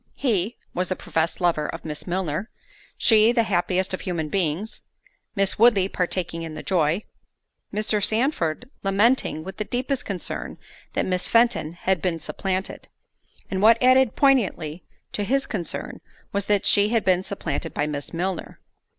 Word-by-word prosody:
He, 220 -4 0 0.2
was 180 +1 -1
the 185 - 0
professed 160 -1 -1
lover 165 -4 +1
of - - -7
Miss 150 +2 -5
Milner—she, 205 - +1
the 235 -2 +3
happiest 185 -1 0
of 185 - -3
human 165 -4 -3
beings—Miss 195 +3 -3
Woodley 215 -5 +5
partaking 175 -2 -2
in 160 -2 -6
the 155 - -7
joy—Mr. 200 +4 -2
Sandford 220 - +1
lamenting, 195 -4 +2
with 190 +1 -8
the 210 - -1
deepest 255 +4 -2
concern, 195 -4 -4 0.4
that - - 0
Miss 180 -1 0
Fenton 230 -9 +3
had 180 0 0
been 175 -1 0
supplanted; 190 +3 -4 0.6
and 190 -1 -1
what 225 +2 +7
added 255 -1 +4
poignantly 190 - +2 0.3
to 205 - -2
his 270 +6 +1
concern 180 -7 -5 0.3
was, 200 0 -1
that 205 -2 +2
she 205 0 +5
had 230 -1 +1
been 185 -1 +3
supplanted 170 -7 -4
by 145 - -1
Miss 145 -1 -4
Milner. 180 +1 -3
190 Hz, 145 wpm, -24 LUFS, 170-220 Hz, 0.6 s, what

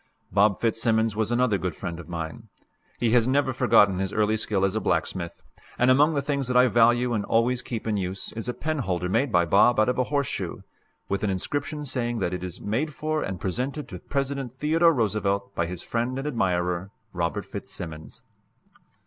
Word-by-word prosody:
Bob 100 0 +3
Fitzsimmons 115 -1 +1
was 110 0 0
another 120 -4 +2
good 90 -3 -3
friend 85 -3 -5
of 85 - -10
mine. 85 +6 -6 0.5
He 115 -1 +1
has 120 -1 +4
never 135 0 +2
forgotten 105 -7 +4
his 95 0 -1
early 105 0 +2
skill 105 -3 +1
as 95 +2 -1
a - - +1
blacksmith, 85 -1 -2 0.3
and 125 +1 +4
among 150 +4 +4
the 140 - 0
things 140 -2 -1
that 125 0 +2
I 125 +1 +6
value 120 +2 +4
and 105 -3 0
always 120 +2 +2
keep 115 -3 -5
in 110 -2 0
use 95 0 -4
is 115 +1 -5
a - - -1
penholder 100 - -2
made 120 +7 +1
by 85 -2 +4
Bob 105 +6 +4
out 110 - +4
of 125 - 0
a 125 - +2
horseshoe, 140 0 -2 0.5
with 100 +1 -2
an 105 - +1
inscription 145 - -2
saying 120 -3 -1
that 90 -4 -1
it 90 - -4
is 90 -2 -6
"Made 135 +8 -2
for 155 0 -1
and 95 -2 -4
presented 130 - -3
to 90 -5 -7
President 140 0 -3
Theodore 160 +6 +3
Roosevelt 100 - 0
by 85 -3 -1
his 90 0 -5
friend 120 +2 -2
and 135 +2 -3
admirer, 90 -7 0 0.2
Robert 85 -2 -2
Fitzsimmons." 80 -2 -7
115 Hz, 195 wpm, -25 LUFS, 95-130 Hz, 0.5 s, I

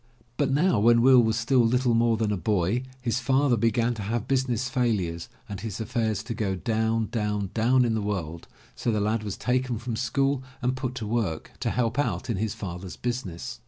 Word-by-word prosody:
But 145 0 +1
now 150 - +3
when 115 +2 +5
Will 130 -1 +7
was 110 -1 +1
still 125 +2 +2
little 125 +1 +3
more 115 0 +3
than 110 -1 0
a - - +1
boy, 100 +4 0 0.2
his 120 0 0
father 130 +1 +2
began 115 +1 +1
to 110 - -6
have 110 +3 -2
business 130 -2 0
failures 105 -11 -1 0.2
and 100 -2 -6
his 110 -2 -5
affairs 110 -3 -1
to 115 - -4
go 105 -4 -1
down, 110 +2 0
down, 105 -3 -1
down 125 +3 +3
in 115 - +1
the 110 - 0
world, 85 -6 -4 0.3
so 120 - -1
the 105 - 0
lad 110 +2 0
was 105 -3 -5
taken 125 -1 0
from 120 0 -4
school 135 +3 0 0.2
and 125 0 0
put 130 -1 -4
to 115 - -4
work, 105 -8 -2
to - - -1
help 120 +1 0
out 115 -6 -1
in 105 - -2
his 105 +1 -2
father's 90 -1 -6
business. 120 -9 -4
115 Hz, 205 wpm, -26 LUFS, 105-125 Hz, 0.3 s, Will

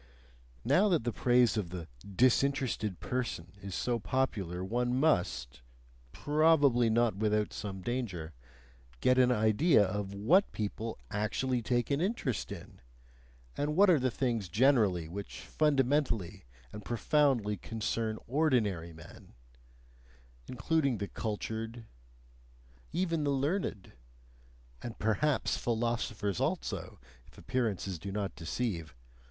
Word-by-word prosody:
Now 205 +3 +4
that 170 -10 +2
the 120 -1 -2
praise 120 -1 +3
of 100 -5 -2
the 85 -2 -7
"disinterested 120 -1 +1
person" 120 -9 -3
is 100 -1 -6
so 120 -1 0
popular 95 -5 -1
one 120 +4 0
must 90 - 0 0.5
probably 145 - +3
not 115 -2 +2
without 105 0 0
some 95 -3 -6
danger 95 -10 -3 0.7
get 125 - +3
an 125 -1 +5
idea 110 +3 +4
of 100 +1 -4
WHAT 165 - +3
people 110 +2 -4
actually 120 +4 -1
take 120 +1 0
an 140 +2 +1
interest 180 - -2
in, - - -10 0.7
and 150 +1 -1
what 195 +1 +6
are 160 - +4
the 130 0 +1
things 115 -6 -1
generally 105 - +3
which 100 +4 -7
fundamentally 135 - 0 0.3
and 105 0 -8
profoundly 120 -1 +1
concern 110 +2 -3
ordinary 115 - +1
men 80 0 -14 1.1
including 140 0 0
the 100 0 -3
cultured, 110 +1 -4 1.1
even 165 -2 0
the 145 - 0
learned, 140 - -1 0.9
and 120 - -7
perhaps 120 +7 +1
philosophers 115 -4 -1
also, - - -3 0.3
if - - -20
appearances 100 -8 -2
do 95 +4 -6
not 100 -1 -3
deceive. 85 - -3
115 Hz, 115 wpm, -31 LUFS, 100-130 Hz, 1.1 s, what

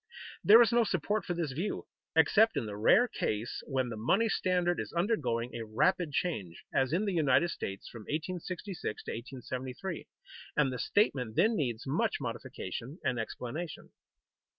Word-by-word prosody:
There 225 +3 +9
is 225 - +1
no 235 0 +5
support 205 0 -1
for 175 - -2
this 165 -5 -2
view, 175 +10 -3 0.3
except 205 +8 +5
in - - 0
the 105 -1 -5
rare 110 - +5
case 110 - -2
when 130 -3 0
the 115 - -4
money 190 - +2
standard 180 -3 +1
is - - -4
undergoing 135 - 0
a 115 - -4
rapid 150 - +1
change, 105 - -2
as 130 0 +2
in 185 +6 +1
the 200 - 0
United 160 +1 +3
States 95 0 -5
from 115 -3 -10
1866 180 - -4
to - - -5
1873, 130 +7 -5 0.5
and 135 -3 +3
the 125 - -4
statement 125 - +1
then 225 +2 +4
needs 120 - -2
much 140 +4 +1
modification 125 - -5
and 125 - 0
explanation. 125 +9 -5
145 Hz, 160 wpm, -31 LUFS, 120-185 Hz, 0.5 s, There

